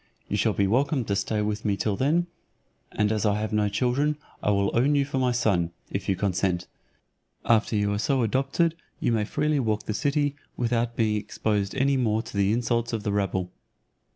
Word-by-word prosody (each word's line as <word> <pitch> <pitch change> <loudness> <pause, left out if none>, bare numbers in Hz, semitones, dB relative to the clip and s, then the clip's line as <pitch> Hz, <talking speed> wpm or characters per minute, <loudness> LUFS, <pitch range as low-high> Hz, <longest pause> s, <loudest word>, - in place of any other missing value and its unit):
You - - -2
shall 105 +1 +2
be 100 - +1
welcome 130 +5 +1
to 100 - 0
stay 105 +2 0
with 105 0 -2
me 100 -2 0
till 105 -1 0
then; 155 - +2 0.7
and 105 0 +1
as 110 -1 0
I 105 -1 +2
have 110 0 -3
no 105 -1 +2
children, 130 +8 +1 0.2
I - - 0
will 100 -1 +1
own 135 +5 +3
you 140 -1 +3
for 135 -1 -2
my 125 -1 +2
son, 100 -8 +1 0.2
if 95 0 -3
you 95 - +3
consent; 90 -2 0 0.8
after 115 -1 +3
you 105 0 +1
are 105 - -1
so 130 +3 +1
adopted, 135 +8 +1 0.3
you - - +1
may 110 -2 +1
freely 150 +5 0
walk 110 -4 0
the 110 - -3
city, 145 +3 0 0.2
without 120 -1 0
being 110 -2 +1
exposed 105 -1 -2
any 135 +1 +2
more 110 -3 +1
to - - -10
the 100 0 +2
insults 120 0 0
of 110 -2 -2
the 105 - -1
rabble." 95 -3 -1
110 Hz, 205 wpm, -26 LUFS, 105-130 Hz, 0.8 s, own